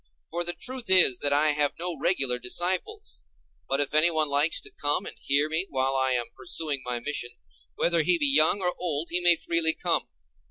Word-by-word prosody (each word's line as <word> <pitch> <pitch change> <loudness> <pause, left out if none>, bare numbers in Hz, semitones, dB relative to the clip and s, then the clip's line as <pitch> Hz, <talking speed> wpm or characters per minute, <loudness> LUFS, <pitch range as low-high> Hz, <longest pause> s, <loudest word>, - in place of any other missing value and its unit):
For 170 +1 0
the 175 0 -1
truth 255 +3 -7
is 180 -10 +7
that 145 - +2
I 150 +2 +2
have 145 -1 0
no 175 0 -3
regular 135 -5 0
disciples: 185 - -3 0.5
but 135 - 0
if 145 0 -1
anyone 155 -1 +2
likes 145 +3 +1
to - - -10
come 145 0 -2
and - - -9
hear 140 +2 +1
me 160 +5 -2
while 135 0 -1
I 130 -1 +1
am 120 -2 -3
pursuing 150 -4 -3
my 125 -1 -4
mission, 120 -2 -5 0.4
whether 170 -1 +1
he 175 +3 +3
be 150 - +1
young 155 +7 +3
or 180 0 +1
old, 165 -2 -3
he 175 - +1
may 175 -1 +4
freely 165 -1 0
come. - - -2
155 Hz, 200 wpm, -25 LUFS, 140-175 Hz, 0.5 s, is